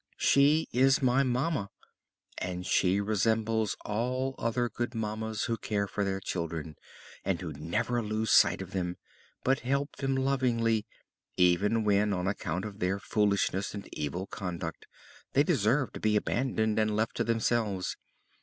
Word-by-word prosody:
"She 145 +3 +4
is 135 +2 +4
my 130 +1 +4
mamma 130 -3 0 0.7
and 90 0 -4
she 95 +2 +3
resembles 110 +1 +1
all 125 +5 -1
other 120 +1 0
good 120 0 -4
mammas 110 0 -2
who 115 - -1
care 105 -2 -1
for 100 - -2
their 95 -1 -1
children, 85 -4 -4 0.5
and 95 -3 0
who 85 -4 -5
never 105 - -1
lose 110 0 -1
sight - - +5
of - - -11
them, 90 -2 -2 0.5
but 135 +1 +2
help 140 +3 -1
them 135 -1 0
lovingly, 120 -5 +1 0.5
even 100 +5 +3
when, 105 0 +3
on 90 -1 -1
account 100 -1 -2
of 105 -1 -8
their 95 +2 0
foolishness 100 -1 0
and 100 - -7
evil 75 +5 -3
conduct, 90 -3 -5 0.5
they 140 - +5
deserve 130 - +1
to - - -6
be 110 -1 +2
abandoned 110 -1 0
and 110 -1 +1
left 110 +1 0
to - - +2
themselves. 115 -5 0
110 Hz, 150 wpm, -30 LUFS, 100-120 Hz, 0.7 s, sight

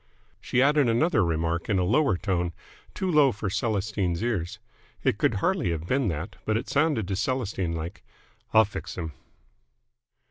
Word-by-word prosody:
She 125 - +1
added 145 -2 +4
another 120 - +3
remark 85 0 -1
in 100 - +2
a 90 - +2
lower 125 +2 +2
tone, 90 -3 -1 0.4
too 190 -1 -1
low 150 -4 +5
for 100 -3 -4
Celestine's 100 -4 -1
ears. 100 -5 -2 0.5
It - - +1
could - - +2
hardly - - +1
have 85 -1 -3
been 130 +5 +1
that, 85 +2 -4
but 110 0 +1
it 115 - -4
sounded 145 - +1
to 95 - -1
Celestine 100 -7 -1
like: 80 +1 -6 0.5
"I'll 110 0 +6
fix 100 - -7
'm!" 80 -4 -4
100 Hz, 165 wpm, -26 LUFS, 85-125 Hz, 0.5 s, I'll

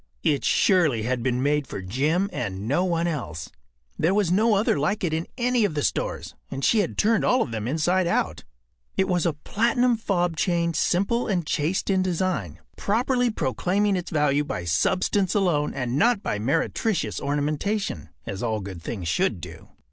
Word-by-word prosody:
It 150 -5 +1
surely 155 - +3
had 125 +1 -1
been 125 +1 0
made 145 -1 +1
for - - -6
Jim 145 - 0
and 100 -3 -4
no 145 +8 +2
one 170 -2 0
else. 140 - -4 0.5
There 165 +5 +2
was 200 -5 +2
no 215 +4 +3
other 200 -7 +2
like 195 +8 0
it 165 -3 0
in 160 +1 -2
any 245 -1 +2
of 190 -7 0
the 145 - -1
stores, - - -2 0.2
and 135 0 -3
she 225 - +4
had 195 - -1
turned 220 0 +3
all 250 -1 +3
of 120 - -7
them 110 -1 -3
inside 175 +6 +1
out. 175 - -1 0.5
It 190 - +2
was 175 -2 +1
a 165 - +1
platinum 235 - +1
fob 175 -6 0
chain 170 -1 +1
simple 200 +9 +1
and 180 -6 0
chaste 160 +7 0
in 190 -1 +2
design, 175 - -1 0.2
properly 245 +4 +1
proclaiming 190 - 0
its 180 -1 -3
value 150 -2 +2
by 90 -11 -4
substance 185 - +1
alone 170 -7 +1
and 125 0 -2
not 230 -2 +3
by 105 - -2
meretricious 140 - -1
ornamentation—as 145 - -3
all 110 -3 -1
good 95 -4 -7
things 90 -1 -5
should 80 - +1
do. - - -10
170 Hz, 180 wpm, -25 LUFS, 130-195 Hz, 0.5 s, she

